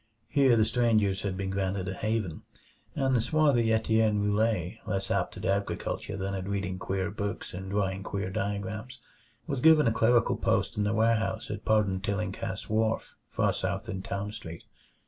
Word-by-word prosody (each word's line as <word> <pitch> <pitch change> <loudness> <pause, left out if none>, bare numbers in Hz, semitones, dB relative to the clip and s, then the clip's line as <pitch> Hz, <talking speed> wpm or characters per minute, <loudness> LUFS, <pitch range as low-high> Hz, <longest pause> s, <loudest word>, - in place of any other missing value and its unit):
Here 135 -5 +4
the 110 - +4
strangers 110 -5 +2
had 95 -2 -3
been 95 0 -2
granted 95 -1 -1
a 95 - -2
haven; 105 -5 -2 0.5
and 135 -1 +2
the 120 - +3
swarthy 125 -3 +3
Etienne 110 -1 +2
Roulet, 105 -1 0
less 95 -2 -2
apt 95 -1 0
at 95 - -6
agriculture 100 0 -2
than 95 0 -3
at 95 -1 -4
reading 95 -2 -2
queer 95 +1 -2
books 100 0 -4
and 95 +1 -6
drawing 95 -1 -1
queer 95 -1 -3
diagrams, 105 +6 -4 0.5
was 140 -5 -3
given 160 -1 +6
a 115 - +4
clerical 115 +1 +3
post - - +1
in 105 - 0
the 105 - +1
warehouse 110 0 +1
at 105 0 -6
Pardon 105 -4 +2
Tillinghast's 100 -1 -3
wharf, 110 +1 0
far - - +1
south - - -2
in 95 - -4
Town 100 +2 -4
Street. 80 -5 -8
105 Hz, 170 wpm, -29 LUFS, 95-110 Hz, 0.5 s, given